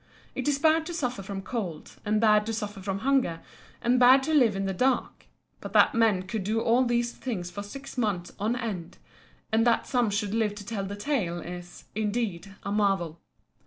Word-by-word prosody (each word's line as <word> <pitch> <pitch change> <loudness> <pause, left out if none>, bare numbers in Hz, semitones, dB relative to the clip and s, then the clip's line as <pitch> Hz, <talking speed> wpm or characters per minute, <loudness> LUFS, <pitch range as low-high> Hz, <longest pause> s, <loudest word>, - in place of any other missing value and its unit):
It 260 - -3
is 290 -1 +2
bad 320 +2 +3
to 345 - -4
suffer 250 -9 -2
from 195 0 -6
cold 190 -9 -5
and 210 +1 +1
bad 210 -1 +4
to 225 - -1
suffer 210 -2 -4
from 195 +1 -3
hunger, 265 -12 +2 0.4
and 245 +1 +3
bad 255 +2 +7
to 315 - -1
live 245 -9 +4
in 195 0 -1
the 195 - -1
dark; 255 +6 0 0.3
but - - -8
that - - +6
men 220 -5 +3
could 195 +2 -4
do 215 +4 0
all 235 +3 +3
these 240 -1 +1
things 185 -11 -5
for 205 - -5
six 270 +6 -8
months 195 -7 -1
on 220 +4 0
end, 210 -9 -5 0.5
and 220 +1 +3
that 235 - +3
some 245 -4 +1
should 205 0 -1
live 220 -2 +1
to 205 -1 -9
tell 200 -3 -3
the 200 +1 -5
tale, 205 - -1
is, 175 0 -8
indeed, 205 -3 -2
a 200 - -3
marvel. 195 -6 0
215 Hz, 200 wpm, -27 LUFS, 195-245 Hz, 0.5 s, bad